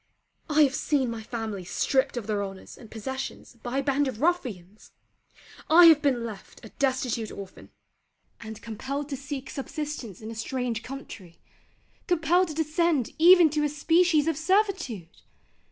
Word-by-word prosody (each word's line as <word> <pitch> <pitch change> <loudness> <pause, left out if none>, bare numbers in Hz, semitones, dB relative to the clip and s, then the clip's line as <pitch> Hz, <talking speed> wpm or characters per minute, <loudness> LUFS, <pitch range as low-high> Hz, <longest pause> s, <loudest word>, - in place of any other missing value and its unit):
I 305 0 +5
have 275 -2 +2
seen 270 -4 0
my 230 -1 -5
family 220 -4 -5
stripped 260 +9 0
of 235 - -4
their 205 -1 -1
honours 195 -1 -9
and 225 - -14
possessions 255 +2 -6
by 245 +2 -4
a 275 - 0
band 280 +1 +1
of 245 -5 -5
ruffians. 225 - -2 0.8
I 340 +2 +8
have 320 -3 +7
been 255 -5 +1
left 220 +1 -10
a - - -10
destitute 255 -5 -1
orphan: 195 -2 -10 0.7
and 220 -1 -8
compelled 275 +6 -5
to 280 - -3
seek 280 0 -6
subsistence 290 - -6
in 220 +1 -8
a - - -6
strange 235 0 -3
country: 225 -10 -10 0.7
compelled 350 +2 +2
to 310 - -7
descend 320 -3 +1
even 345 -1 +7
to 300 0 0
a 295 - +1
species 320 +1 +2
of 325 -3 0
servitude! 335 - -1
270 Hz, 155 wpm, -26 LUFS, 225-310 Hz, 0.8 s, I